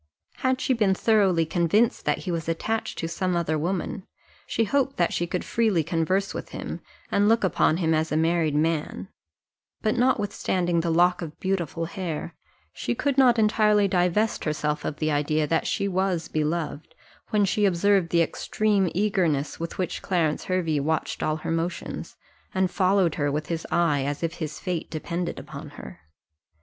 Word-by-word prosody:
Had 260 0 +1
she 260 - +1
been 210 -5 +2
thoroughly 195 -7 +3
convinced 175 +8 +1
that - - +2
he 180 - -1
was 165 -1 -3
attached 220 +7 -2
to 165 - -2
some 180 +2 -1
other 165 -2 0
woman, 185 +5 -3 0.4
she 230 - +1
hoped 270 +4 0
that 175 - +1
she 175 - -1
could 180 +1 -3
freely 215 -8 +1
converse 175 +5 0
with - - -6
him, - - -6 0.3
and 205 +1 +3
look 225 0 +3
upon 165 -3 +2
him 165 -3 +1
as 160 0 0
a 155 - +1
married 160 -2 +2
man; 150 - -1 0.7
but 215 - +1
notwithstanding 200 -8 +1
the 170 - -1
lock 175 +2 +3
of 155 -3 -7
beautiful 175 -3 -1
hair, 170 -2 -5 0.4
she 120 - -2
could 280 -2 0
not 255 -3 +5
entirely 210 -1 +4
divest 185 +4 +1
herself 150 -1 -1
of 145 - -3
the 155 -1 0
idea 150 +1 +1
that 160 +2 0
she 200 - 0
was 185 -3 0
beloved, 155 0 -3 0.3
when 210 -2 +3
she 205 +2 +1
observed 190 -1 +3
the 170 0 +4
extreme 205 +2 0
eagerness 180 -9 0
with 165 0 -5
which 185 - -2
Clarence 165 -5 0
Hervey 170 -5 0
watched 160 +3 -1
all 155 - +1
her 155 - -4
motions, 165 +2 -3 0.4
and 190 -1 +1
followed 185 -3 +2
her 145 0 +1
with 150 +2 -3
his 165 -1 -3
eye 165 -5 +2
as 145 +3 -3
if 165 - -1
his 155 -2 -4
fate 180 -4 -3
depended 170 +2 -3
upon 145 +2 -8
her. - - -10
175 Hz, 175 wpm, -25 LUFS, 160-200 Hz, 0.7 s, not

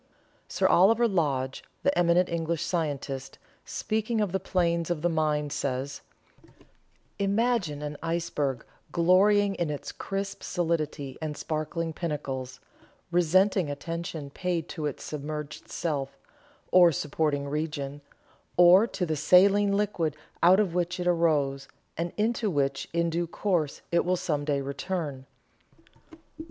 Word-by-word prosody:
Sir - - -1
Oliver 225 +6 +5
Lodge, 140 - -1 0.2
the 280 - +2
eminent 175 +1 +3
English 170 -1 -2
scientist, 145 -6 -3 0.3
speaking 220 +1 -1
of 205 -4 0
the 190 - 0
planes 170 -3 0
of 170 -3 -2
the 175 - +3
mind, 150 -3 0
says: 140 +1 -3 1.2
"Imagine 200 -7 +1
an 150 0 -5
iceberg 150 -6 -2 0.3
glorying 195 +4 +4
in 170 -4 -2
its 145 -1 -5
crisp 195 0 -4
solidity, 155 -5 -2
and 150 -2 -4
sparkling 160 +1 -3
pinnacles, 135 -6 -4 0.5
resenting 180 0 +3
attention 160 0 -5
paid 175 0 -2
to 150 -2 -3
its 145 - -6
submerged 150 0 -6
self, 140 -5 -3 0.5
or 180 -2 +7
supporting 145 -1 -1
region, 145 -1 -3 0.6
or 180 +5 +7
to 195 -5 -2
the 160 -2 -1
saline 200 +5 +5
liquid 180 -7 0 0.3
out 180 +3 +6
of 195 -5 +1
which 180 0 -1
it 180 - -2
arose, 150 -6 +1 0.3
and 170 +1 -2
into 220 0 +1
which 140 -4 -1
in 170 0 0
due 170 +1 -1
course 170 -5 -1
it 170 - +3
will 180 +1 +1
some 150 -4 -2
day 145 -2 0
return. 140 -1 -4
165 Hz, 130 wpm, -27 LUFS, 145-180 Hz, 1.2 s, or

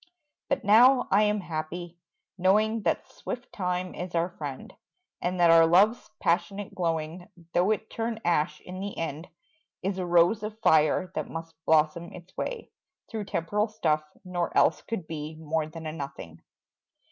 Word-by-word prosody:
But 275 - 0
now 245 +5 +6
I 200 - +5
am 210 -1 +2
happy, 170 +1 -5 0.4
knowing 215 +4 +2
That - - 0
swift 245 0 -7
time 180 -1 -2
is 180 -1 -6
our 170 +1 +1
friend, 145 -6 -7 0.5
And 180 +1 -1
that 170 -1 +6
our 165 0 +7
love's 205 +8 +4
passionate 180 +4 0
glowing, 165 0 -2 0.3
Though 180 +3 +3
it 215 0 0
turn 225 0 -3
ash 150 -3 +1
in 185 +1 -8
the 200 +1 -5
end, 160 0 -4 0.6
Is 190 0 -1
a 185 - -1
rose 175 +5 +4
of 215 0 -5
fire 160 0 +3
that - - -3
must 165 0 -7
blossom 160 +2 +2
its 180 +1 -13
way - - -4 0.4
Through 220 -3 -3
temporal 205 +5 0
stuff, 160 -8 0 0.2
nor 175 -1 -2
else - - +4
could 205 -7 -5
be 155 0 -6
More 155 0 -2
than 160 +1 -9
a 155 - -3
nothing. 140 - -8
175 Hz, 160 wpm, -27 LUFS, 160-205 Hz, 0.6 s, our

